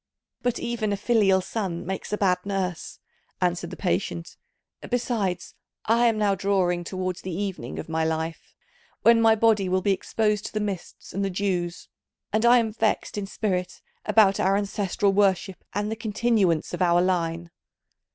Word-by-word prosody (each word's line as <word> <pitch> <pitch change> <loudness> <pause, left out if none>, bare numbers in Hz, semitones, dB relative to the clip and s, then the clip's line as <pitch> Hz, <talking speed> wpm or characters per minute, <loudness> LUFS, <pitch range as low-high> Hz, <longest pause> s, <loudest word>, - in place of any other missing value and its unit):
"But 245 -1 0
even 235 -3 -2
a 200 - 0
filial 200 -3 +3
son 185 -4 -4
makes 190 +1 -4
a 210 - 0
bad 185 -3 +2
nurse," 190 -4 -3 0.4
answered 175 -1 0
the - - -8
patient; 170 -2 -2 0.5
"besides, 230 -7 -1 0.3
I 235 +2 +4
am 225 -2 +2
now 205 -2 +2
drawing 185 -3 +1
towards 185 0 -4
the 185 - -5
evening 200 -2 -4
of - - -6
my 160 0 -1
life, 160 +1 -3 0.5
when 230 0 +6
my 225 -1 +6
body 215 -4 +3
will 185 0 +1
be 200 - +3
exposed 210 +1 -1
to - - -10
the 215 - -1
mists 200 -4 -5
and 200 - -1
the 195 - 0
dews, 180 -2 -2 0.5
and 220 +2 +2
I 245 +1 +7
am 225 -3 0
vexed 220 -1 0
in 205 -1 -3
spirit 185 -3 -2 0.2
about 200 -3 +4
our 195 +1 +3
ancestral 200 0 0
worship 190 -2 +1
and 205 +2 -2
the - - -1
continuance 215 -6 +1
of - - -4
our 175 -1 +4
line." 170 -2 0
195 Hz, 170 wpm, -25 LUFS, 180-215 Hz, 0.5 s, I